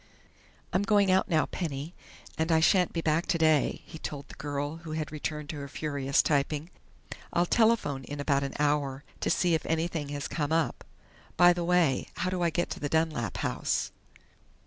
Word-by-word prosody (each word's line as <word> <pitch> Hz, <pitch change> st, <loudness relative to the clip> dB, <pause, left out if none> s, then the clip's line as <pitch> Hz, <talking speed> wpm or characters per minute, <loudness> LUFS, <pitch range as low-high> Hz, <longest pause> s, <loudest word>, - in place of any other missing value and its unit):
"I'm 185 Hz, -, +3 dB
going 205 Hz, -2 st, +3 dB
out 190 Hz, +2 st, +3 dB
now, 160 Hz, -3 st, +3 dB
Penny, 155 Hz, -1 st, -4 dB, 0.4 s
and 160 Hz, +1 st, 0 dB
I 160 Hz, -, +5 dB
shan't 180 Hz, +2 st, +4 dB
be 165 Hz, -, -2 dB
back 160 Hz, +2 st, +1 dB
today," 160 Hz, -5 st, +2 dB
he 160 Hz, -, -10 dB
told 145 Hz, -2 st, -6 dB
the -, -, -12 dB
girl 145 Hz, +2 st, -4 dB
who 165 Hz, -1 st, -8 dB
had 155 Hz, -2 st, -3 dB
returned 150 Hz, 0 st, -4 dB
to 155 Hz, -, -4 dB
her 140 Hz, -1 st, -6 dB
furious 140 Hz, -2 st, 0 dB
typing. 150 Hz, +3 st, 0 dB, 0.6 s
"I'll 175 Hz, -, +3 dB
telephone 215 Hz, -, +2 dB
in 145 Hz, 0 st, -6 dB
about 140 Hz, -1 st, +1 dB
an 140 Hz, -1 st, -4 dB
hour 145 Hz, -2 st, 0 dB, 0.2 s
to -, -, -1 dB
see 175 Hz, -2 st, +2 dB
if 160 Hz, -, +1 dB
anything 160 Hz, -2 st, -1 dB
has 145 Hz, 0 st, -4 dB
come 150 Hz, -2 st, -2 dB
up.... 165 Hz, -1 st, 0 dB, 0.5 s
By 175 Hz, 0 st, +7 dB
the 175 Hz, 0 st, -3 dB
way, 170 Hz, -6 st, +2 dB
how 185 Hz, -, -1 dB
do 185 Hz, -1 st, -2 dB
I 170 Hz, -, +3 dB
get 175 Hz, +2 st, -1 dB
to -, -, -4 dB
the 145 Hz, -, -2 dB
Dunlap 155 Hz, -, 0 dB
house?" -, -, -1 dB
155 Hz, 190 wpm, -29 LUFS, 145-170 Hz, 0.6 s, By